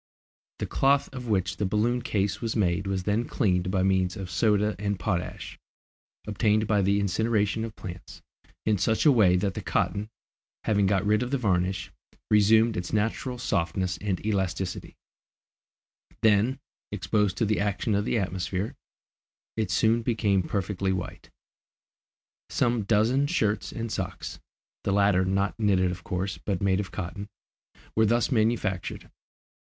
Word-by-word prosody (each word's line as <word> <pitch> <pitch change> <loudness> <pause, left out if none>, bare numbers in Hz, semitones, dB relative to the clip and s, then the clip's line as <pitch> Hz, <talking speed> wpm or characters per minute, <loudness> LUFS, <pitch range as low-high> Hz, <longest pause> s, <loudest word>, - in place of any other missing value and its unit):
The - - -3
cloth 140 0 +2
of 125 -2 -6
which 95 -2 0
the 105 - 0
balloon 115 +5 +1
case 100 -3 -1
was 115 -1 -2
made 95 -2 +1
was 95 -1 -1
then 105 +5 0
cleaned 95 -6 0
by 95 -1 +1
means 95 -2 +1
of 95 -2 -6
soda 105 +2 +2
and 100 -1 -1
potash, 90 -1 -3 0.7
obtained 105 0 +1
by 105 -1 +2
the 100 +1 +2
incineration 105 +2 +1
of 115 -1 -6
plants, 90 -1 -9 0.4
in 105 -3 +2
such 110 - +1
a 150 - +8
way 105 -8 +5
that 95 +1 0
the - - -5
cotton, 105 +2 -1 0.5
having 100 -2 +2
got 95 0 +1
rid 105 +2 +3
of 125 - -2
the 140 - +1
varnish, 95 -6 0 0.4
resumed 110 +2 +5
its 90 0 -4
natural 110 +4 -1
softness 90 -4 -1
and 100 -2 -2
elasticity; 95 -3 -2 1.3
then, 110 +5 +3 0.3
exposed 105 -3 0
to 115 - +2
the 105 0 +1
action 105 +2 0
of 100 0 +1
the 115 - 0
atmosphere, 95 +1 -2 0.8
it 110 -4 -1
soon 110 +5 +3
became 105 -4 +1
perfectly 95 +1 -2
white. 90 -2 -5 1.2
Some 120 -3 +1
dozen 115 +7 +2
shirts 110 - 0
and 115 -1 -5
socks - - -5 0.4
the 100 - 0
latter 100 -2 +3
not 100 +3 0
knitted 95 -4 +2
of 90 0 -7
course, 95 +1 -3
but 100 -3 -2
made 95 0 +2
of 100 -2 -3
cotton 100 +4 -6 0.7
were 110 0 +4
thus 120 +5 +2
manufactured. 110 -5 0
100 Hz, 150 wpm, -27 LUFS, 95-110 Hz, 1.3 s, a